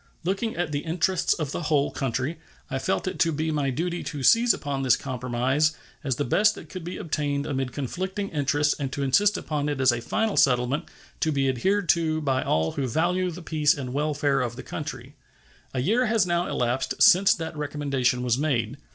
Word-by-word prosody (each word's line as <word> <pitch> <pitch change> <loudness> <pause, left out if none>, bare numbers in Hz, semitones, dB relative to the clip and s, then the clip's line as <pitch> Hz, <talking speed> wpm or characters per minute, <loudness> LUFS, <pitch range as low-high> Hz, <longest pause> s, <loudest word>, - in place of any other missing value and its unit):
Looking 195 +6 -1
at 175 -3 -2
the 145 - -1
interests 170 +3 +1
of 155 -5 -3
the - - -3
whole 150 -3 +1
country, 135 +4 -2 0.3
I 135 - -1
felt 190 +6 -1
it - - -4
to 165 - +3
be 155 +1 -1
my 145 -3 0
duty 170 +6 -2
to 145 -3 -5
seize 230 - +6
upon 140 -6 -2
this 130 -2 +4
compromise 130 +4 0 0.3
as 135 -4 0
the 145 - -2
best 210 - +3
that - - -11
could 185 -3 -7
be 175 +2 -5
obtained 145 -3 -2
amid 135 -3 -2
conflicting 190 - -4
interests 145 0 +1
and 135 -2 -3
to 140 - -2
insist 205 +10 +3
upon 150 -1 -2
it 145 -2 -2
as 130 -2 +5
a 120 0 -3
final 220 - -1
settlement, 125 +1 +2 0.3
to 160 - +1
be 135 -2 +1
adhered 190 +10 +1
to 160 -1 +2
by 135 -4 0
all 80 +1 0
who 135 -2 -2
value 180 +8 +1
the 175 0 -8
peace 155 -2 +2
and 130 -3 -5
welfare 145 -1 +1
of 120 -2 -3
the - - -8
country. - - -7 0.6
A 130 - -2
year 230 - +2
has 220 -3 +2
now 175 0 0
elapsed 120 +2 -1
since 195 +3 +6
that 160 -1 -6
recommendation 140 -4 -1
was 125 0 +1
made. 130 -4 -1
145 Hz, 205 wpm, -25 LUFS, 130-175 Hz, 0.6 s, seize